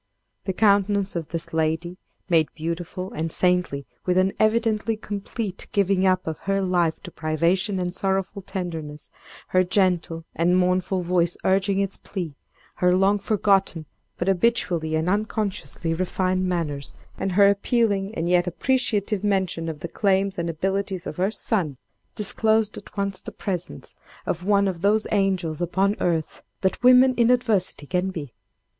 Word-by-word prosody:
The 190 - -1
countenance 200 -1 +2
of 165 -3 -3
this 165 -1 -5
lady, 160 +3 -1 0.3
made 165 -4 +3
beautiful 170 +3 -4
and 160 +1 -3
saintly 180 -7 +1 0.2
with 180 0 +1
an 185 +1 +3
evidently 220 0 +2
complete 205 -1 -5
giving 195 -1 +2
up 185 0 +2
of 160 -1 -4
her 195 0 +2
life 175 -4 0
to 180 - -8
privation 170 +6 0
and 180 -1 -2
sorrowful 195 +1 -1
tenderness, 160 -6 -6 0.4
her 185 0 +4
gentle 175 -3 0
and 175 +2 +2
mournful 185 0 +1
voice 175 -1 +1
urging 195 +1 +2
its 200 -1 -1
plea, 175 -7 -5 0.4
her 180 0 +3
long 195 +2 +3
forgotten 195 -5 +1 0.3
but 175 - -2
habitually 180 -5 +1
and 160 +2 0
unconsciously 205 -4 -1
refined 185 +1 0
manners, 155 -6 -3 0.2
and 195 - -2
her 200 +1 +6
appealing 200 0 +1
and 165 - -1
yet 175 0 +3
appreciative 210 -1 0
mention 190 -5 0
of 150 -2 -7
the - - -3
claims 195 +1 +1
and 170 0 -1
abilities 190 +2 -2
of 150 - -6
her 185 +2 +2
son, 185 - -1 0.4
disclosed 220 +1 +1
at - - -11
once 200 -1 -2
the - - -8
presence 180 -3 -5 0.3
of 175 +1 -2
one 200 0 +3
of 180 -3 -3
those 210 +3 +3
angels 190 -6 0
upon 190 +4 +1
earth 165 -3 -1 0.2
that 190 - 0
women 255 +1 +7
in 235 -1 +4
adversity 220 - +1
can 180 +4 -1
be. 150 -9 -7
185 Hz, 150 wpm, -24 LUFS, 170-200 Hz, 0.4 s, women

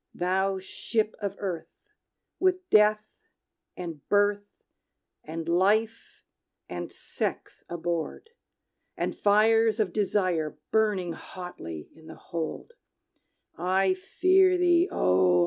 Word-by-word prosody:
"Thou 190 +2 0
Ship 215 +3 -2
of 200 -2 -3
Earth, 195 - -7 0.5
with 370 -1 +1
Death, 210 0 +3 0.6
and 165 -5 -6
Birth, 205 0 +1 0.6
and 160 +1 -6
Life, 210 +6 +1 0.4
and 85 0 -6
Sex - - -5
aboard, 170 - -4 0.7
And - - -2
fires 220 +1 +4
of 205 -5 0
Desires 185 -6 0 0.2
burning 205 -6 +1
hotly 85 - -8
in 160 0 -17
the - - -9
hold, 170 - -6 0.9
I 185 +1 +2
fear 370 - +3
thee, 350 0 +3
O! 90 -1 +3
195 Hz, 100 wpm, -27 LUFS, 170-220 Hz, 0.9 s, fires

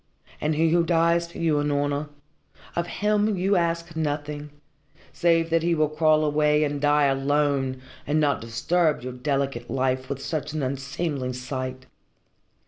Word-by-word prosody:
And 155 +1 +1
he 160 +1 +2
who 170 0 +4
dies 170 0 +2
for - - -11
you, 160 -3 +1
Unorna 145 0 -1 0.7
of 170 0 -1
him 210 +1 +1
you 195 +3 +2
ask 170 -1 -1
nothing, 150 -1 -3 0.6
save 165 -1 +2
that 165 0 +3
he 170 +1 +1
will 155 -1 +2
crawl 155 0 +3
away 150 0 +3
and 145 -1 -2
die 145 0 +4
alone, 135 -1 +1 0.2
and 150 +2 +2
not 145 -2 +1
disturb 150 +7 0
your 130 0 -5
delicate 135 -2 -2
life 130 0 -1
with 140 -1 -3
such 150 +1 -4
an 155 -2 -2
unseemly 135 0 -3
sight." 130 0 -5
150 Hz, 150 wpm, -25 LUFS, 135-165 Hz, 0.7 s, who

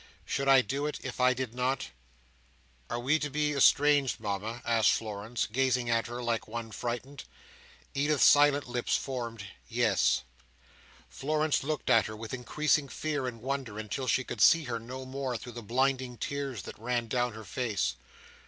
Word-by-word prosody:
Should 140 - -2
I 135 -1 +7
do 140 +4 -2
it 150 - -3
if 130 -1 -6
I 130 0 +4
did 125 -2 -4
not?" 125 - -1 1.0
"Are 120 - -2
we 140 +6 +2
to 150 - -2
be 150 +1 0
estranged, 145 0 +4
Mama?" 110 +3 -4
asked 115 -2 +4
Florence, 110 +1 -3
gazing 125 +1 +1
at 115 0 +1
her 120 +1 -5
like 115 -1 -1
one 115 0 -5
frightened. 120 +5 -5 0.7
Edith's 145 +1 +3
silent 145 -1 +5
lips 120 -1 0
formed 115 -5 -5 0.2
"Yes." - - +2 0.8
Florence 155 +1 0
looked 150 0 -1
at 115 - +5
her 110 - -7
with 110 +1 -7
increasing 140 +3 +1
fear 145 -3 -2
and 115 -2 -7
wonder, 130 -5 -3
until 110 +5 -4
she 125 +2 +2
could 120 -4 -5
see 165 +8 +7
her 120 -4 -3
no 130 +3 -7
more 130 -2 -3
through 120 - -9
the 120 0 -8
blinding 130 +2 0
tears 135 -8 -4
that - - -9
ran 120 0 -1
down 120 0 0
her 110 0 -9
face. 100 - -1
125 Hz, 170 wpm, -30 LUFS, 115-140 Hz, 1.0 s, I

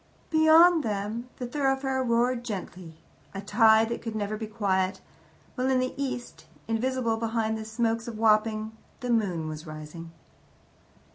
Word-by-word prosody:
Beyond 320 +1 +6
them 215 +3 -3
the 250 - -4
thoroughfare 270 0 0
roared 240 0 +1
gently 185 -7 -7 0.4
a 195 - -4
tide 220 +1 +4
that 235 - -4
could 225 -1 -5
never 210 0 -2
be 220 0 -5
quiet, 190 -3 0 0.5
while 255 0 -1
in 260 - +3
the 255 0 -1
east, 265 -3 -5 0.2
invisible 230 0 0
behind 225 -1 -1
the 220 0 -6
smokes 230 +1 -1
of 230 -2 -6
Wapping, 215 0 +2 0.3
the 250 -1 -2
moon 185 -9 0
was 155 +1 -7
rising. 155 +2 -9
225 Hz, 145 wpm, -27 LUFS, 205-250 Hz, 0.5 s, Beyond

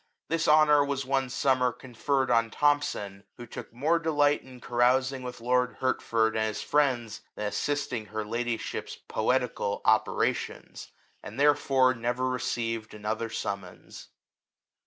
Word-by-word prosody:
This 165 0 0
honour 150 -1 +6
was 140 -1 -2
one 135 -1 0
sum 130 0 +1
mer 125 -1 +2
conferred 130 +2 -2
on 115 -1 +3
Thomson, 115 -9 0
who 120 - -8
took 115 - -9
more 150 +8 +1
delight 150 -3 +2
in 130 -1 -14
carousing 130 +3 +1
with 125 -1 -7
lord 125 +1 +1
Hertford 115 -3 +1
and 110 0 +1
his 110 - -4
friends, 125 -7 0
than 105 - -4
assisting 125 0 -2
her 110 0 -4
ladyship's 115 +1 -3
poe - - -5
tical - - 0
operations, - - 0 0.3
and 110 +6 -9
therefore 140 -3 +4
never 120 +2 -1
received 115 -3 -3
another 110 +2 -3
summons. 100 -5 -6
125 Hz, 135 wpm, -28 LUFS, 115-140 Hz, 0.3 s, honour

